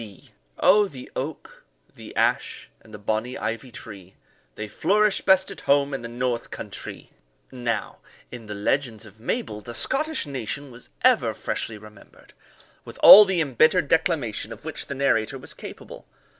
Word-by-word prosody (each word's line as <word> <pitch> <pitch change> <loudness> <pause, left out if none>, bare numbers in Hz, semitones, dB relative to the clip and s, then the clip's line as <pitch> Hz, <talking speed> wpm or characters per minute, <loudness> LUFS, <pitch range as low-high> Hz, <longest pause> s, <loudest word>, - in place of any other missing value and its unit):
D. 105 -4 -13 0.3
Oh, 205 +2 +5
the 130 -8 -11
oak, 145 +3 -6 0.3
the - - -12
ash, - - -1
and 110 - -19
the 105 - -8
bonny 110 +4 -2
ivy 115 +4 -4
tree, 95 -5 -10 0.4
They 105 - -5
flourish 200 - +2
best 190 0 +3
at - - -10
home 140 0 +3
in 135 - -3
the 115 - -6
North 120 0 -3
Countrie! - - -7 0.4
Now, 120 -5 -3 0.3
in 120 -3 -9
the 105 - -6
legends 115 +1 -1
of 105 0 -16
Mabel, 115 - -3
the 120 +3 -9
Scottish 305 - -1
nation 140 0 -5
was 120 0 -12
ever - - +3
freshly 110 - -4
remembered, 105 -1 -17 0.5
with - - -12
all 210 +1 +12
the 190 -3 0
embittered 155 +4 +3
declamation 145 - 0
of 115 +5 -10
which 160 - -4
the 140 - -5
narrator 135 -2 +1
was 130 - -8
capable. - - -11
125 Hz, 160 wpm, -24 LUFS, 110-155 Hz, 0.5 s, all